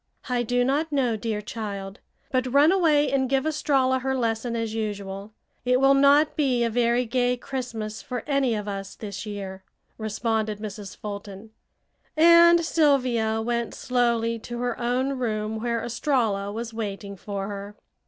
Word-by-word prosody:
"I 250 -2 0
do 245 +1 +1
not 290 +5 0
know, 255 -5 +1
dear 215 -1 -3
child, 200 -3 -6 0.3
but 255 -1 0
run 285 +5 +6
away 315 -6 +3
and 265 -2 +1
give 270 +1 +1
Estralla 270 -4 +2
her 265 +1 -1
lesson, 230 0 -1
as 225 -1 -2
usual. 205 -2 -4 0.3
It 250 0 +3
will 270 +1 +5
not 280 +2 +5
be 260 -5 +2
a 230 - 0
very 240 +1 +2
gay 245 +1 +1
Christmas 240 -5 -5
for 250 -2 -5
any 275 -5 +1
of 210 -1 -4
us 195 -1 -5
this 210 0 -7
year," 195 -2 -6 0.4
responded 220 0 -1
Mrs. 210 -2 -7
Fulton, 205 0 -8 0.7
and 340 +1 +7
Sylvia 250 -9 +2
went 235 -1 -2
slowly 235 -2 0
to 240 +2 -7
her 245 -1 -2
own 255 +3 0
room 215 -2 -2
where 235 -1 -1
Estralla 230 -5 0
was 230 +2 -5
waiting 200 -2 -5
for 195 +1 -5
her. 200 0 -7
235 Hz, 155 wpm, -25 LUFS, 215-260 Hz, 0.7 s, and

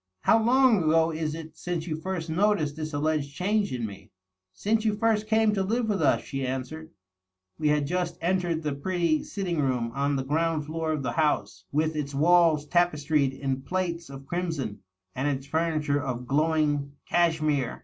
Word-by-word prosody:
" 95 0 -55
How 225 0 +4
long 255 -2 +5
ago 160 +1 +3
is 155 -1 -2
it 160 -1 -9
since 170 0 -3
you 160 -3 -2
first 175 +1 -4
noticed 165 -3 +1
this 155 0 -5
allied 155 +1 0
change 190 +8 -1
in 125 -3 -2
me?" 100 -1 -9 0.2
" 95 0 -59
Since 215 +1 +2
you 215 -2 +1
first 215 0 +1
came 220 -1 +3
to 195 - 0
live 225 +4 0
with 200 -2 0
us," - - +3
she 135 -1 -4
answered. 130 +5 -4 0.7
We 155 - +1
had 150 -1 +2
just 180 +3 -2
entered 175 -2 0
the 150 -2 -1
pretty 165 +1 0
sitting 180 -6 -2
room 125 -4 0
on 140 +2 0
the 135 - -1
ground 155 +2 0
floor 160 +1 -2
of 150 -3 -2
the 120 - -1
house, 145 - 0
with 155 +2 0
its 145 -2 -3
walls 165 0 +4
tapestried 150 -5 +2
in 135 -1 -2
plaits 170 0 -3
of 135 0 -10
crimson 160 - -3 0.3
and 135 +3 -1
its 135 -2 -2
furniture 155 -2 0
of 125 -2 -4
glowing 145 0 +1
cachemire. 155 -6 +1
155 Hz, 185 wpm, -27 LUFS, 140-175 Hz, 0.7 s, long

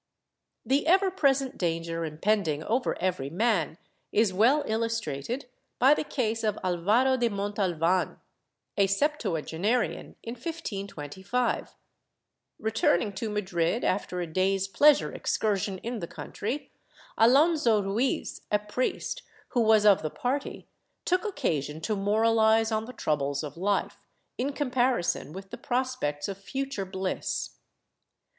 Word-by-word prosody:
The 280 +3 +1
ever 380 +2 +4
present 275 -6 +1
danger 165 -1 -1
impending 160 -1 0
over 245 +7 0
every 175 -7 -1
man 180 -3 +1 0.3
is 215 -3 +3
well 250 +10 +4
illustrated 225 - -2 0.3
by 265 +4 +6
the 300 - -1
case 225 -6 -1
of 215 -1 0
Alvaro 210 +9 +2
de 240 -2 +2
Montalvan, 190 -4 0 0.6
a 200 -1 +4
septuagenarian, 205 - -1
in 230 - -5
1525. 200 - -3 0.8
Returning 220 -3 +1
to 215 +3 -3
Madrid, 190 0 0
after 185 -1 -1
a 175 - -1
day's 190 +3 +1
pleasure 290 +9 +4
excursion 200 -2 -1
in 235 0 -3
the 170 - -5
country, 240 - -5 0.4
Alonso 250 -3 +4
Ruiz, 215 +7 -1
a 210 - +5
priest, 230 - -2 0.3
who 245 - +1
was 220 -1 +5
of 205 -2 +6
the 155 - -2
party, 265 - -3 0.4
took 365 +1 +2
occasion 160 - -2
to 215 +6 -1
moraHze 220 +2 +3
on 220 0 -1
the 250 - -9
troubles 145 - -1
of 150 - -6
life, 200 +4 0 0.4
in 270 +3 0
comparison 250 - 0
with 195 +3 -9
the - - -6
prospects 245 - -1
of 195 -1 -5
future 265 -1 -4
bliss. 190 0 -3
210 Hz, 125 wpm, -28 LUFS, 185-250 Hz, 0.8 s, by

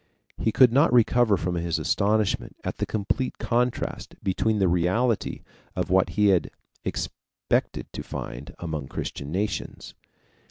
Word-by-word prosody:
He 110 - +1
could 125 0 +6
not 145 +5 +5
recover 120 -3 +4
from 90 +1 -2
his 85 -1 -1
astonishment 105 0 +1
at - - -4
the - - -2
complete 110 +5 -1
contrast 125 +1 -1
between 110 +3 +1
the 95 -2 +3
reality 95 +7 +1 0.3
and - - 0
what 95 -1 +3
he 105 -1 +5
had 90 -3 +3 0.3
expected - - -2
to - - -4
find 65 +4 -7
among 80 -5 -4
Christian 70 +2 -5
nations. 100 +4 -3
100 Hz, 135 wpm, -26 LUFS, 90-115 Hz, 0.3 s, could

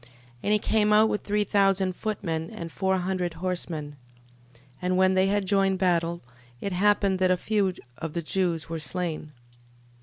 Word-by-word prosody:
12:33. 120 - -20 0.3
And 210 - +1
he - - +5
came 210 0 +2
out 215 +1 +6
with 210 - -1
three 210 0 +1
thousand 195 -2 +2
footmen 170 -7 -3
and 165 -1 -7
four 190 +1 0
hundred 180 -2 -2
horsemen. 165 -4 -4 0.6
12:34. - - -24 0.2
And 180 0 0
when 190 0 +4
they 190 0 +3
had 205 0 +1
joined 195 -1 +2
battle, 170 -2 +1 0.4
it 200 - -3
happened 200 0 +3
that 185 -1 +3
a 185 - +3
few 195 -1 0 0.2
of 160 -2 -5
the 170 - -3
Jews 170 -1 -1
were 165 0 -4
slain. 160 -2 -4
185 Hz, 180 wpm, -26 LUFS, 170-200 Hz, 0.6 s, out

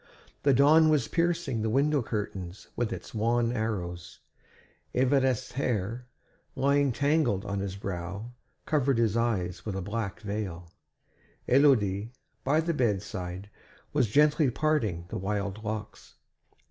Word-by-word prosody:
The 140 - +4
dawn 150 +4 +6
was 150 -6 +2
piercing 170 -8 0
the 110 - 0
window 140 +4 +2
curtains 100 -4 -5
with 120 -2 -1
its - - -7
wan 115 +1 +1
arrows. 90 -7 -4 0.8
Évariste's 130 -1 +2
hair, 120 -2 -2 0.5
lying 140 0 +3
tangled 140 -7 +1
on 100 0 -2
his 95 -1 -3
brow, 100 +4 -5 0.3
covered 140 -4 +2
his 115 -2 +2
eyes 95 -7 -1
with 105 -3 -4
a 95 - -2
black 105 0 -3
veil; 100 -5 -5 0.8
Élodie, 115 -7 +3 0.3
by 150 +4 +3
the 165 +1 -1
bedside, 100 - -2 0.4
was 140 -5 +3
gently 150 - +4
parting 120 - 0
the - - -4
wild 100 +2 -3
locks. 105 0 -6
115 Hz, 125 wpm, -28 LUFS, 100-140 Hz, 0.8 s, dawn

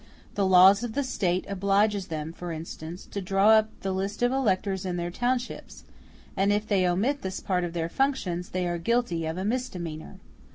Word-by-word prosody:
The 200 -2 +1
law 185 +1 +8
of 220 +3 -3
the 285 - +1
State 185 -8 -1
obliges 200 +1 +1
them, 160 0 -5
for 175 0 -6
instance, 165 +1 -7
to 200 - -3
draw 195 +3 +3
up 220 0 +5
the 195 - -2
list 195 +4 -2
of 245 - +3
electors 195 -7 0
in 180 -2 -3
their 175 0 -3
townships; 245 +5 -3 0.5
and 195 +1 +2
if 205 +1 +1
they 190 -4 +2
omit 230 +11 0
this 190 0 -4
part 180 -2 -1
of 170 -1 -4
their 165 -1 -1
functions, 180 -7 -1
they 185 0 -2
are 175 0 -2
guilty 175 -5 0
of 160 +2 -3
a 190 - -3
misdemeanor. 180 -10 -4
190 Hz, 195 wpm, -27 LUFS, 175-215 Hz, 0.5 s, law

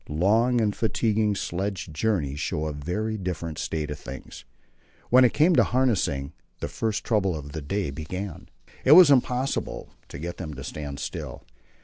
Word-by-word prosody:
Long 110 +10 +3
and 105 -3 +1
fatiguing 110 -2 +1
sledge 95 -2 -3
journeys 75 -7 -1
show 75 - -2
a 75 - -3
very 90 +10 -3
different 85 -5 -4
state 75 -2 -3
of 75 - -5
things. - - -9 0.7
When 130 +1 +7
it 125 - +3
came 165 +4 +4
to - - +7
harnessing, 110 - 0 0.3
the - - -3
first 110 -2 -2
trouble 100 -6 +1
of 75 -2 -7
the 80 - -5
day 90 +2 -2
began. 85 +5 -6 0.3
It 135 - +7
was 170 -3 +9
impossible 130 0 0 0.2
to - - -8
get 85 +3 -5
them 80 -5 -6
to 65 - -7
stand 70 -1 -6
still. - - -6
95 Hz, 165 wpm, -26 LUFS, 75-110 Hz, 0.7 s, was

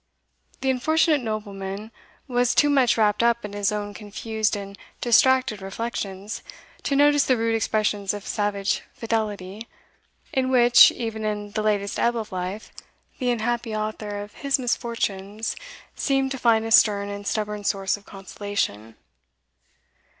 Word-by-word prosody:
The 265 0 +2
unfortunate 310 +3 +2
nobleman 210 -2 -5 0.4
was 245 -1 +1
too 290 - +4
much 260 -5 +3
wrapped 210 -1 +3
up 235 -1 +2
in 205 - -7
his 205 0 0
own 205 -1 -3
confused 215 +1 -2
and 200 -1 -7 0.2
distracted 245 -2 +3
reflections, 195 0 -5 0.4
to 280 - -1
notice 290 0 +5
the 255 - +3
rude 230 0 0
expressions 210 -2 0
of 205 -1 -6
savage 205 -2 -1
fidelity, 215 -2 -3 0.7
in 260 -1 +1
which, 245 -2 +7
even 225 -2 -4
in 210 -1 -3
the 215 - -2
latest 205 -2 0
ebb 240 0 +2
of 220 -2 -5
life, 185 +3 -5 0.5
the 250 - 0
unhappy 235 -1 -1
author 215 -1 -4
of 205 - -13
his 280 -1 0
misfortunes 225 -4 -2 0.4
seemed 270 -1 0
to 265 - -4
find 225 -2 +3
a 225 - -4
stern 205 -3 +5
and 200 0 -6
stubborn 210 -1 -2
source 195 -1 0
of 205 - -14
consolation. 195 - -4
215 Hz, 145 wpm, -24 LUFS, 205-240 Hz, 0.7 s, which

